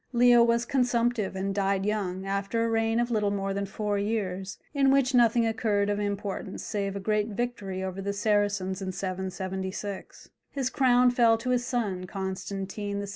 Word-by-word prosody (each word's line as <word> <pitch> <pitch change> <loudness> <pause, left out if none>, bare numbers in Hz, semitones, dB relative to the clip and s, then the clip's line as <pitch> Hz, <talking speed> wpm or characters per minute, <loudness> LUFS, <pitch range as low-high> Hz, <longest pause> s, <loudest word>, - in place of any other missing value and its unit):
Leo 240 0 +6
was 235 0 +3
consumptive 240 -5 +1
and 195 +1 -2
died 195 -1 0
young, 195 -3 -2
after 200 +3 -1
a - - 0
reign 225 0 +1
of 240 0 0
little 210 -3 +1
more 195 -1 -2
than 200 0 -2
four 205 0 -2
years, 195 -3 -2 0.2
in 275 -2 +3
which 270 -1 +3
nothing 235 -1 +4
occurred 215 -2 +1
of 205 - -1
importance 200 -1 -3
save 200 -2 -2
a - - -3
great 210 +1 0
victory 205 -4 -3
over 190 +1 -4
the 200 +1 -2
Saracens 205 -2 0
in 190 -1 -3
776. 190 +1 -5 0.2
His 265 -2 -2
crown 250 -2 +4
fell 235 -2 +4
to 250 +3 -2
his 245 0 +1
son, 195 -7 -2
Constantine 195 +1 -4
VI. - - -9
205 Hz, 175 wpm, -28 LUFS, 195-235 Hz, 0.2 s, Leo